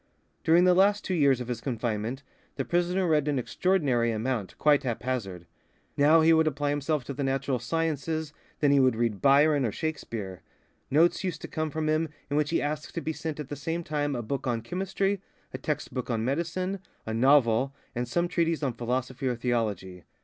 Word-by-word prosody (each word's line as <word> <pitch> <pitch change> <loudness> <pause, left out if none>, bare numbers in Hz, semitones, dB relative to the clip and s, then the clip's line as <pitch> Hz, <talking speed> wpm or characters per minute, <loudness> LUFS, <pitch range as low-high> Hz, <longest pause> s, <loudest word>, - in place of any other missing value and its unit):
During 170 +2 +5
the 180 0 +6
last 200 +3 +3
two 185 - -1
years 140 -6 +3
of 125 - -5
his 125 -1 -4
confinement 120 +1 -3 0.3
the - - -2
prisoner 175 +2 +1
read 150 -3 +2
an 145 -2 +1
extraordinary 130 -5 +1
amount, 115 -2 -3
quite 150 -2 +4
haphazard. 120 -8 -3 0.5
Now 155 +3 +5
he 165 +1 +5
would 160 0 +4
apply 145 -1 0
himself 145 0 -1
to 140 - -6
the 140 +1 -3
natural 135 -1 0
sciences, 160 +2 -2 0.3
then 145 -2 +4
he 140 - +5
would 130 -3 +4
read 115 -3 -1
Byron 145 +1 +5
or 115 - 0
Shakespeare. 110 - -5 0.5
Notes 165 +7 +3
used 185 -2 -3
to - - -4
come 155 0 -2
from 155 +1 -2
him 155 +1 +1 0.2
in - - 0
which 150 0 +1
he 165 - +1
asked 150 +1 -4
to - - 0
be 160 - -2
sent 155 -1 -5
at 145 -2 -6
the 145 - -4
same 165 +4 -3
time 145 -2 -1
a 120 - -3
book 135 +4 -3
on 120 -2 0
chemistry, 195 +5 -1 0.3
a - - -5
text 150 -2 -3
book 125 -1 -4
of 115 -2 0
medicine, 170 - -2 0.3
a 110 - -3
novel, 130 +1 +3 0.2
and 120 0 -2
some 170 +8 0
treatise 165 -2 0
on 130 -3 0
philosophy 125 +2 -2
or 125 - 0
theology. 105 -7 -2
140 Hz, 200 wpm, -28 LUFS, 120-160 Hz, 0.5 s, the